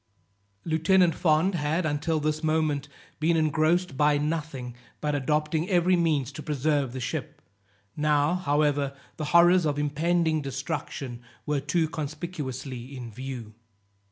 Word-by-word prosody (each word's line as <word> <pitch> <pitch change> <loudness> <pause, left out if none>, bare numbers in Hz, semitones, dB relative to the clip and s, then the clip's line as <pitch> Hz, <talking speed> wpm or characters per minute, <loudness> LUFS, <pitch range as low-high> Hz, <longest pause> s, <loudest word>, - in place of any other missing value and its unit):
Lieutenant 165 +2 +3
Fond 165 +3 +2
had, 160 +1 0
until 155 +1 0
this 155 +1 -1
moment, 155 -2 +1 0.3
been 165 +2 +2
engrossed 155 +1 +2
by 150 0 +4
nothing 150 -5 -3 0.3
but 150 -1 -1
adopting 150 +4 0
every 180 0 +4
means 155 -7 +1
to 155 - -8
preserve 145 -2 0
the 130 - -5
ship; 125 0 -4 0.6
now, 150 +1 +2
however, 145 -5 +1 0.2
the 155 - -3
horrors 175 +3 +5
of 150 -2 0
impending 160 +2 +1
destruction 135 -2 -5 0.2
were 150 -1 0
too 160 +4 0
conspicuously 140 -5 -5
in 120 -2 -7
view. 125 -2 -7
150 Hz, 130 wpm, -27 LUFS, 140-160 Hz, 0.6 s, horrors